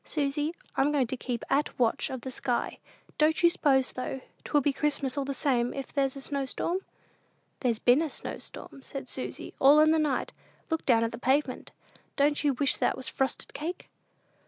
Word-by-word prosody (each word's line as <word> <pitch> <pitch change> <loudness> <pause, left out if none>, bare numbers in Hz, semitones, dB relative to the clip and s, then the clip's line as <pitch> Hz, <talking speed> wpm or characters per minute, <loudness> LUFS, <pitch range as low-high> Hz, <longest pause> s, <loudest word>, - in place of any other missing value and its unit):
Susy, 295 +2 -1 0.2
I'm 280 +2 +3
going 280 -3 +2
to 245 - -3
keep 245 -2 -4
at 290 +2 0
watch 235 -3 +1
of 260 -2 -5
the 260 - -6
sky. 245 -1 -2 0.4
Don't 315 +3 +3
you 340 - +7
s'pose, 270 -6 +2
though, 260 +1 -4 0.2
'twill 295 - +2
be 280 +1 +1
Christmas 280 -2 0
all 280 -1 -1
the 275 - -2
same, 245 -5 +1
if 275 -1 -6
there's 275 -2 +1
a 275 - -7
snow 275 0 -2
storm?" 345 +7 -1 0.8
"There's 240 -4 +1
been 270 +8 +3
snow," - - -6
said 275 -1 -9
Susy, 255 - -5
"all 285 +3 +7
in 310 +1 +6
the 320 - +3
night. 290 -4 0 0.4
Look 320 - -1
down 230 -3 +5
at 230 - 0
the 230 - -7
pavement. 265 +1 0 0.5
Don't 290 +1 +2
you 290 -2 +3
wish 275 +2 +2
that - - +1
was 260 - -4
frosted 265 -1 -2
cake?" 325 +5 -5
275 Hz, 190 wpm, -29 LUFS, 255-295 Hz, 0.8 s, you